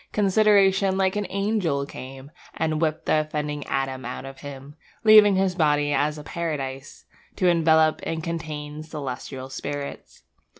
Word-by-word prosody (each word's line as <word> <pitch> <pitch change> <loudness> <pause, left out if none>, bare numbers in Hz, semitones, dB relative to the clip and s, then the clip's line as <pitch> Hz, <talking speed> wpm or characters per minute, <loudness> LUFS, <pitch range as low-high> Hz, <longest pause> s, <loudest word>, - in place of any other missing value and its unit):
Consideration 195 -2 +3
like 190 0 +1
an 210 -2 -2
angel 195 -8 0
came, 135 +1 -10 0.2
And 155 -1 -1
whipped 155 -1 -1
the 155 - +3
offending 150 -1 -3
Adam 135 -1 -2
out 125 +2 -6
of 135 0 -10
him. 140 0 -10 0.3
Leaving 215 -2 +8
his 190 -1 +1
body 150 -4 +2
as 150 +1 0
a 150 - -8
paradise, 145 -5 -5 0.3
To 185 - +1
envelop 160 -2 +4
and 160 -1 -3
contain 155 -3 -5
celestial 135 -3 -6
spirits. 140 +1 -6
155 Hz, 140 wpm, -24 LUFS, 140-185 Hz, 0.3 s, Leaving